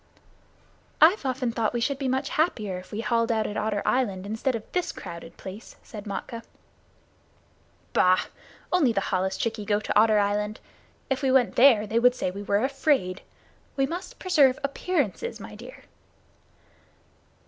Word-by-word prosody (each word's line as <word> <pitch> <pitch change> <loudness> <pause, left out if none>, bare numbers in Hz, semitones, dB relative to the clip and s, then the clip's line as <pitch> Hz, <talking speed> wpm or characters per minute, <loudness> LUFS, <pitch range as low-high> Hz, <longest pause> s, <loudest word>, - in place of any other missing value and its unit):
"I've 320 -1 +5
often 255 -2 -1
thought 225 0 -1
we - - +1
should 270 +3 -1
be 270 - -1
much 265 +2 -1
happier 215 - 0
if 185 - -14
we 210 - -3
hauled 230 0 +1
out 220 -1 +1
at 205 - -4
Otter 210 -2 -1
Island 200 -7 0
instead 225 +5 -1
of 225 - -5
this 360 -1 -1
crowded 170 0 -9
place," 195 +4 -10
said 210 -2 -9
Matkah. 215 +3 -5 1.5
"Bah! 185 0 +4 0.5
Only 300 -10 +3
the 195 - 0
holluschickie 190 +4 -1
go 205 0 +1
to 215 - -4
Otter 215 0 +5
Island. 210 +1 0 0.5
If 265 - 0
we 265 -2 +2
went 260 -2 +3
there 235 -5 +6
they 220 +2 +1
would 250 +1 +4
say 185 - -2
we 200 +2 -7
were 205 +2 +1
afraid. 270 -9 0 0.6
We 270 - +3
must 360 - -6
preserve 295 -9 +3
appearances, 295 - -2
my - - -9
dear." - - -12
230 Hz, 160 wpm, -26 LUFS, 205-270 Hz, 1.5 s, there